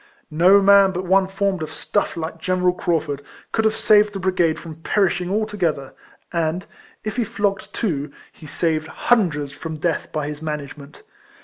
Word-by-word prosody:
No 185 Hz, +6 st, +5 dB
man 200 Hz, -1 st, +6 dB
but 185 Hz, +1 st, -3 dB
one 190 Hz, +1 st, +3 dB
formed 195 Hz, -2 st, -1 dB
of 155 Hz, -1 st, -4 dB
stuff 205 Hz, +3 st, -2 dB
like 165 Hz, 0 st, -5 dB
General 180 Hz, +1 st, +1 dB
Craufurd 160 Hz, -5 st, -1 dB, 0.3 s
could 220 Hz, -, 0 dB
have 220 Hz, 0 st, +2 dB
saved 210 Hz, -1 st, +4 dB
the 195 Hz, -, -4 dB
brigade 180 Hz, -4 st, +1 dB
from 160 Hz, -2 st, -9 dB
perishing 180 Hz, -2 st, +1 dB
altogether; 190 Hz, -10 st, -1 dB, 0.4 s
and, 170 Hz, +2 st, -1 dB, 0.4 s
if 215 Hz, +3 st, -4 dB
he 245 Hz, -, +2 dB
flogged 200 Hz, -2 st, -2 dB
two, 150 Hz, -9 st, -2 dB, 0.2 s
he 155 Hz, -, -13 dB
saved 160 Hz, 0 st, -1 dB
hundreds 160 Hz, -, +1 dB
from 160 Hz, +2 st, -7 dB
death 165 Hz, +1 st, -2 dB
by 155 Hz, -2 st, -2 dB
his 150 Hz, 0 st, -6 dB
management. 150 Hz, -2 st, -7 dB
175 Hz, 165 wpm, -21 LUFS, 155-200 Hz, 0.4 s, man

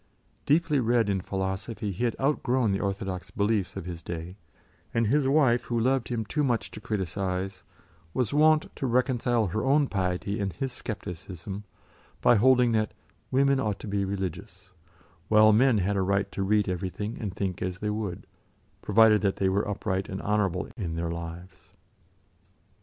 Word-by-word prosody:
Deeply 150 Hz, -1 st, +3 dB
read 115 Hz, -3 st, +2 dB
in 95 Hz, -2 st, 0 dB
philosophy, 95 Hz, +3 st, -3 dB
he 100 Hz, +7 st, -2 dB
had 115 Hz, -, 0 dB
outgrown 130 Hz, -5 st, +1 dB
the 95 Hz, -, 0 dB
orthodox 95 Hz, -2 st, -3 dB
beliefs 100 Hz, -2 st, 0 dB
of -, -, -5 dB
his 85 Hz, -2 st, -6 dB
day, 85 Hz, +2 st, -6 dB, 0.6 s
and 115 Hz, 0 st, +3 dB
his 135 Hz, +5 st, +2 dB
wife, 135 Hz, -4 st, +3 dB
who 120 Hz, -1 st, -1 dB
loved 130 Hz, +1 st, +1 dB
him 115 Hz, -3 st, -2 dB
too 150 Hz, -, -1 dB
much 120 Hz, -4 st, 0 dB
to 105 Hz, -, -9 dB
criticise, 95 Hz, -2 st, -3 dB, 0.5 s
was 125 Hz, +5 st, -1 dB
wont 155 Hz, +1 st, +3 dB
to 135 Hz, -, -2 dB
reconcile 120 Hz, -2 st, +1 dB
her 105 Hz, +4 st, -2 dB
own 140 Hz, +2 st, +4 dB
piety 95 Hz, -2 st, -2 dB
and 100 Hz, -3 st, -2 dB
his 130 Hz, +10 st, -3 dB
scepticism 100 Hz, -3 st, -7 dB, 0.5 s
by -, -, +5 dB
holding 125 Hz, +2 st, +5 dB
that 110 Hz, -1 st, 0 dB, 0.3 s
"women 140 Hz, +1 st, +3 dB
ought 105 Hz, -5 st, -1 dB
to -, -, -9 dB
be 100 Hz, 0 st, 0 dB
religious," 95 Hz, 0 st, -5 dB, 0.6 s
while 110 Hz, 0 st, +6 dB
men 125 Hz, +1 st, +4 dB
had 100 Hz, +1 st, 0 dB
a 95 Hz, -, +1 dB
right 100 Hz, +1 st, 0 dB
to -, -, -4 dB
read 105 Hz, +1 st, +2 dB
everything 95 Hz, +4 st, -3 dB
and 100 Hz, -4 st, -4 dB
think 95 Hz, -3 st, -3 dB
as 90 Hz, 0 st, -2 dB
they 105 Hz, +2 st, -2 dB
would, 105 Hz, -4 st, -4 dB, 0.6 s
provided 110 Hz, 0 st, +5 dB
that 100 Hz, -2 st, +1 dB
they 95 Hz, -, +1 dB
were 100 Hz, +2 st, 0 dB
upright 95 Hz, -2 st, -2 dB
and 95 Hz, -, -4 dB
honourable 100 Hz, -3 st, 0 dB
in 85 Hz, -7 st, -3 dB
their 85 Hz, 0 st, -2 dB
lives. 85 Hz, +2 st, -8 dB
105 Hz, 170 wpm, -27 LUFS, 95-120 Hz, 0.6 s, while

